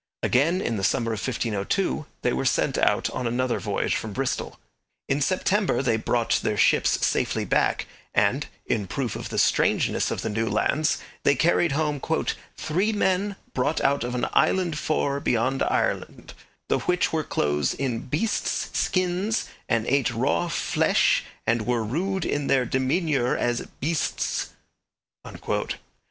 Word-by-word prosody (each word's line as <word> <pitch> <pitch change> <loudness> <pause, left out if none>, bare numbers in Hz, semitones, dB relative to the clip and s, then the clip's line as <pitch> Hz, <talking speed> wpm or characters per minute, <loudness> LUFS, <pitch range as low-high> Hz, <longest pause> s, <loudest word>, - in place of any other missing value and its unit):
Again, 165 +9 +2
in 115 - -1
the 95 - -3
summer 115 +1 +1
of 110 - -3
1502, 120 - -1 0.2
they - - +2
were - - -1
sent - - +1
out - - +2
on 125 - -2
another 125 +1 0
voyage 105 -2 -1
from 110 -2 -4
Bristol. 135 +2 -3 0.5
In 140 +2 0
September 190 +2 +1
they 120 -4 +2
brought 115 +1 +1
their 105 -1 -1
ships - - +3
safely - - 0
back, - - +1 0.3
and, - - +2 0.2
in 100 -3 -1
proof 120 +3 -3
of - - -6
the - - -4
strangeness - - +2
of - - -3
the 115 - -1
new 110 +2 -1
lands 155 +2 +1 0.2
they 140 - +3
carried 165 +2 +2
home 150 -1 0 0.6
'three 185 +8 0
men 200 -1 +1 0.2
brought 130 +5 0
out 140 -1 +2
of 120 +1 -3
an 125 - 0
Iland 180 -4 +2
forre 140 -3 0
beyond 130 +1 0
Irelond, - - -1 0.3
the - - +1
which 180 -1 0
were 160 -1 +1
clothed 75 - 0
in 125 -3 -3
Beestes 170 - -1
Skynnes 185 +4 0 0.2
and 115 -2 +1
ate 135 +1 +2
raw 130 +9 +1
fflesh 170 - +2 0.2
and 115 0 +1
were 120 -2 +1
rude 180 - -1
in 145 -1 -1
their 130 -2 +3
demeanure 130 +1 +1
as 120 0 -1
Beestes.' 155 +3 -1
135 Hz, 150 wpm, -25 LUFS, 115-165 Hz, 0.6 s, ships